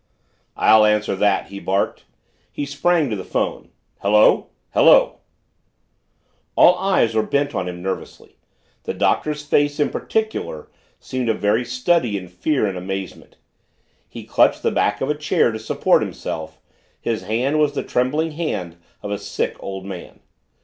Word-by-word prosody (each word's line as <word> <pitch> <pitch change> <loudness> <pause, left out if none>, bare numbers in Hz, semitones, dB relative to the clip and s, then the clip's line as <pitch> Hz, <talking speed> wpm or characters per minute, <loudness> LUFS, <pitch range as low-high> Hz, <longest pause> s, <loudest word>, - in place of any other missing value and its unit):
"I'll 110 0 +6
answer 105 -1 +2
that!" 100 0 +1
he 100 0 -7
barked. 100 +1 -1 0.5
He 145 - -4
sprang 145 0 +1
to - - 0
the 95 - -5
phone. - - -3 0.3
"Hello 105 +2 +4 0.3
hello - - +5 0.7
" - - -45
All 180 - +8
eyes 190 - +2
were 110 - +2
bent 140 +5 -1
on 90 - -2
him 90 0 -7
nervously 95 0 -6 0.5
the - - -3
Doctor's 150 -1 0
face, 145 0 +1
in 145 - +1
particular, 215 - -3 0.3
seemed 130 -2 -3
a 110 - +2
very 105 +4 +1
study 125 -1 +1
in 90 -2 -8
fear 130 - 0
and 95 -3 -3
amazement. 95 0 -6 0.7
He - - -9
clutched - - +2
the - - +2
back 105 0 0
of 135 - -1
a - - +2
chair 150 -5 +1
to 110 - -5
support 110 - +2
himself, 80 -1 -5 0.4
his 115 -2 -2
hand 130 +8 0
was 150 -1 +2
the - - -2
trembling 150 +6 0
hand 95 - -4 0.3
of 105 - -5
a 100 - -2
sick, 100 - -3
old 95 -1 -6
man. 95 -3 -9
110 Hz, 155 wpm, -21 LUFS, 100-145 Hz, 0.7 s, All